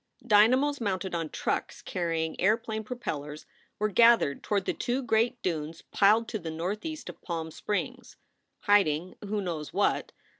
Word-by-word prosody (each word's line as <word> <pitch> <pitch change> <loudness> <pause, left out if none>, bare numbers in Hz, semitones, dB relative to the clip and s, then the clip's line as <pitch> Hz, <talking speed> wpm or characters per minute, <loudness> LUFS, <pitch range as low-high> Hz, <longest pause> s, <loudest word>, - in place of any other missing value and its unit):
1 245 - -18
Dynamos 255 +7 +4
mounted 190 -3 -2
on 165 -2 -2
trucks - - -3
carrying 165 -2 -2
airplane 220 +2 +1
pro 245 +3 -6
pellers 150 -8 -5 0.3
were 210 - +1
gathered 230 - +4
toward 200 -3 -1
the - - 0
two 255 +3 -2
great 230 +1 +1
dunes 160 -2 -3
piled 215 +3 +4
to 220 - -3
the 165 -3 -6
northeast 205 - -4
of - - -9
Palm 165 -2 -4
Springs, 205 +6 -4 0.4
hiding 185 -4 +2
who 210 +1 -2
knows 165 -5 -4
what? 200 +1 +1
200 Hz, 155 wpm, -28 LUFS, 165-225 Hz, 0.4 s, Dynamos